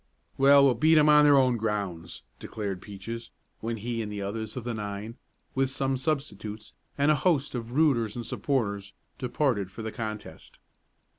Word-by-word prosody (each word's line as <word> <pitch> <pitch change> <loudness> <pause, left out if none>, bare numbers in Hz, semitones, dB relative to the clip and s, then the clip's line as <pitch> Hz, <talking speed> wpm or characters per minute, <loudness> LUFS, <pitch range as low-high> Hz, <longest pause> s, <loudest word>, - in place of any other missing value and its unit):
"Well, 140 +1 +6
we'll 135 - +5
beat 155 +7 +4
'em 150 0 +6
on 150 0 +7
their 145 -1 +7
own 130 -3 +3
grounds!" 100 -6 -3 0.2
declared 100 -4 -5
Peaches, 115 +4 -7 0.3
when 115 +1 -3
he 115 +2 -3
and 105 -1 -5
the 105 - -5
others 110 +3 -4
of 125 - -4
the 120 0 -3
nine, 105 +1 -5 0.4
with 135 0 +1
some 135 0 -1
substitutes, 130 -7 -3 0.2
and 145 +2 +4
a - - +4
host 150 -6 +2
of 120 -1 -5
"rooters" 130 -8 +2
and 120 -1 -5
supporters, 100 -9 -2 0.3
departed 125 -6 0
for 110 +4 -8
the 110 - -4
contest. 110 -2 -7
115 Hz, 170 wpm, -28 LUFS, 105-135 Hz, 0.4 s, on